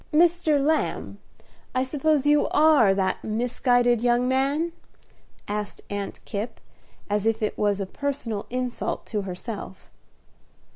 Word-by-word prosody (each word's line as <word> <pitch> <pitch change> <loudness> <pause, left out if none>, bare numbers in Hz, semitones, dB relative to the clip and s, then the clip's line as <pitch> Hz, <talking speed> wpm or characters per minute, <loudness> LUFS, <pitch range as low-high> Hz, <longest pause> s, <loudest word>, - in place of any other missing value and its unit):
"Mr. 330 -1 +4
Lamb, 310 +3 0 0.6
I 255 - +2
suppose 295 +1 +1
you 295 0 +4
are 295 -11 +5
that 190 -1 0
misguided 245 +1 +2
young 245 +1 +2
man?" 275 +6 +1 0.8
said 210 0 -4
Aunt 200 -1 -4
Kipp, 210 +4 -4 0.5
as 210 +1 0
if 225 -1 +1
it 210 - -1
was 205 -1 +1
a 195 - -1
personal 240 -2 -3
insult 250 0 -3
to 210 -3 -2
herself. 190 +1 -7
245 Hz, 125 wpm, -25 LUFS, 210-285 Hz, 0.8 s, are